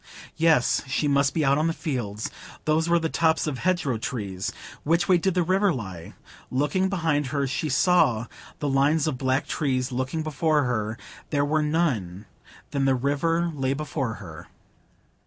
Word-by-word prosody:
Yes, 160 -6 +3
she 140 +3 0
must 140 -1 +3
be 155 -3 0
out 140 +2 +3
on 155 - +2
the 165 - 0
fields; 120 - -4 0.3
those 160 +2 +2
were 170 - +5
the 165 -1 0
tops 160 0 +2
of 145 -5 -3
hedgerow 160 -10 0
trees. 100 -6 -4 0.3
Which 170 +3 +1
way 180 -2 +5
did 190 +1 0
the 180 - +3
river 190 +3 +2
lie? 95 - -6 0.3
Looking 150 +9 +1
behind 160 -7 0
her, 140 +1 -1
she 135 +4 -2
saw 130 -7 +3 0.3
the 145 - -3
lines 140 +3 +2
of 145 -6 -2
black 130 +1 +1
trees; 130 -3 -1
looking 130 +5 -2
before 155 0 +1
her, 110 -3 -2 0.3
there 145 -1 +1
were 155 +1 +1
none; 125 - -1 0.5
then 140 -1 0
the 135 -1 +3
river 165 +6 0
lay 135 -2 -1
before 140 -5 -3
her. 85 -6 -10
145 Hz, 170 wpm, -25 LUFS, 130-160 Hz, 0.5 s, were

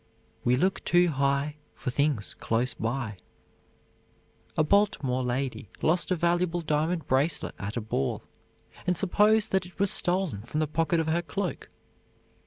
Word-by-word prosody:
"We 125 +1 +3
look 185 +9 0
too 175 0 +4
high 140 +1 0 0.2
For 125 - -4
things 140 -6 +1
close 120 +2 0
by." 115 -2 -3 1.4
A - - +4
Baltimore 150 -9 +2
lady 125 -4 -2
lost 170 +3 +2
a 185 - +2
valuable 175 +1 +1
diamond 160 +2 0
bracelet 140 +5 +1
at 100 +4 -4
a - - -1
ball, 85 -11 -2 0.6
and 180 -1 +2
supposed 210 +3 +3
that 190 -2 +1
it 180 - -18
was 200 -1 +3
stolen 175 - +1
from 120 +7 -4
the 155 - +2
pocket 165 +2 0
of 160 - 0
her 160 +2 +1
cloak. 175 +3 -4
155 Hz, 150 wpm, -28 LUFS, 130-180 Hz, 1.4 s, too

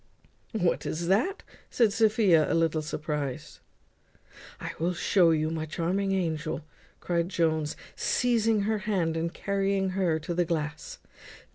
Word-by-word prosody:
"What 180 -6 +1
is 170 +2 -3
that?" 240 - +1 0.3
said 225 -4 +2
Sophia, 210 -8 +4
a - - +2
little 165 -1 +1
surprized. 150 -3 -4 1.0
"I - - -5
will 175 +2 0
show 180 -1 +3
you, 155 -1 +1
my 160 -1 -3
charming 185 +5 -1
angel," 160 -4 -2 0.3
cried 170 0 -1
Jones, 160 -4 0 0.2
seizing 225 -3 +2
her 215 +1 0
hand 170 -6 +1
and 165 +1 -1
carrying 195 0 0
her 185 -4 +1
to 160 +2 -4
the 175 +1 +2
glass. 165 - -3
170 Hz, 135 wpm, -28 LUFS, 160-200 Hz, 1.0 s, Sophia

